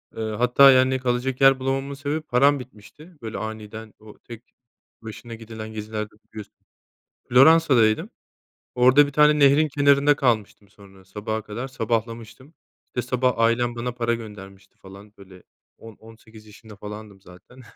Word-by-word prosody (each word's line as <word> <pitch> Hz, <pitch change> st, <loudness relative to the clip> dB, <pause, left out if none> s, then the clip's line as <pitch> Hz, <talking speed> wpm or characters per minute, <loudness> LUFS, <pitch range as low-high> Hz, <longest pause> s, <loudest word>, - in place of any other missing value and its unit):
Iıı, 110 Hz, -1 st, -4 dB
hatta 125 Hz, +4 st, +5 dB
yani 130 Hz, 0 st, +2 dB
kalacak 125 Hz, +1 st, -3 dB
yer 135 Hz, -1 st, +5 dB
bulamamamın 135 Hz, +1 st, -3 dB
sebebi 145 Hz, +3 st, -4 dB
param 140 Hz, 0 st, +2 dB
bitmişti. 130 Hz, -, -15 dB
Böyle, 110 Hz, -1 st, -7 dB
aniden 110 Hz, 0 st, -8 dB
o 110 Hz, -1 st, -16 dB
tek 120 Hz, 0 st, -12 dB, 0.6 s
başına 115 Hz, +1 st, -10 dB
gidilen 110 Hz, -1 st, -10 dB
gezilerde 105 Hz, 0 st, -6 dB, 0.2 s
biliyorsunuz. 105 Hz, -2 st, -11 dB, 0.7 s
Floransa'daydım. 130 Hz, -5 st, +4 dB, 0.7 s
Orada 130 Hz, +4 st, +5 dB
bir -, -, -8 dB
tane 150 Hz, +1 st, +3 dB
nehrin 145 Hz, +2 st, +4 dB
kenarında 140 Hz, 0 st, +2 dB
kalmıştım 110 Hz, -6 st, -2 dB
sonra 95 Hz, -2 st, -19 dB
sabaha 105 Hz, +3 st, -5 dB
kadar 110 Hz, +5 st, -7 dB
sabahlamıştım. 115 Hz, +2 st, -5 dB, 0.3 s
İşte 125 Hz, -, -5 dB
sabah 125 Hz, -1 st, 0 dB
ailem 120 Hz, +1 st, +1 dB
bana 120 Hz, +1 st, -4 dB
para 120 Hz, -1 st, -2 dB
göndermişti 100 Hz, -4 st, -11 dB
falan 100 Hz, +2 st, -15 dB
böyle 95 Hz, -2 st, -16 dB, 0.3 s
on 115 Hz, -1 st, -14 dB
on 110 Hz, +2 st, -17 dB
sekiz 110 Hz, -1 st, -18 dB
yaşında 105 Hz, +1 st, -15 dB
falandım 105 Hz, -1 st, -11 dB
zaten. 90 Hz, +9 st, -17 dB
115 Hz, 140 wpm, -22 LUFS, 110-130 Hz, 0.7 s, hatta